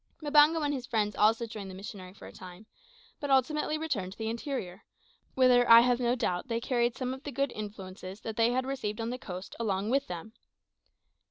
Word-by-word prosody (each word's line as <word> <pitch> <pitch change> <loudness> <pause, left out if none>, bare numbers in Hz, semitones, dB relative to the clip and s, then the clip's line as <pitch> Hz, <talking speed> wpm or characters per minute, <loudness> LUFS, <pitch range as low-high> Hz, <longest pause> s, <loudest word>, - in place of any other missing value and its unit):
Mbango 300 +1 +5
and 290 - 0
his 250 -3 -5
friends 215 -4 0
also 225 +2 +3
joined 215 -4 -8
the 185 - -8
missionary 190 -1 -9
for 195 - -14
a - - -10
time, 185 +3 -12 0.5
but 285 - -4
ultimately 300 +3 +2
returned 225 -13 -3
to - - -21
the 220 0 -2
interior, 230 -6 -5 0.5
whither 250 -2 +5
I 230 0 +10
have 245 0 +2
no 245 0 +1
doubt 180 -6 -2
they 230 -2 -1
carried 240 -1 0
some 255 -1 -2
of 265 - -9
the 290 - -6
good 275 0 -1
influences 195 -2 -8
that 220 - -5
they 230 +2 +3
had 255 +1 0
received 240 -6 -3
on 230 +1 -2
the 250 - -5
coast 185 -3 -8
along 205 -1 -1
with 275 +1 +1
them. 175 +5 -7
230 Hz, 205 wpm, -30 LUFS, 205-260 Hz, 0.5 s, I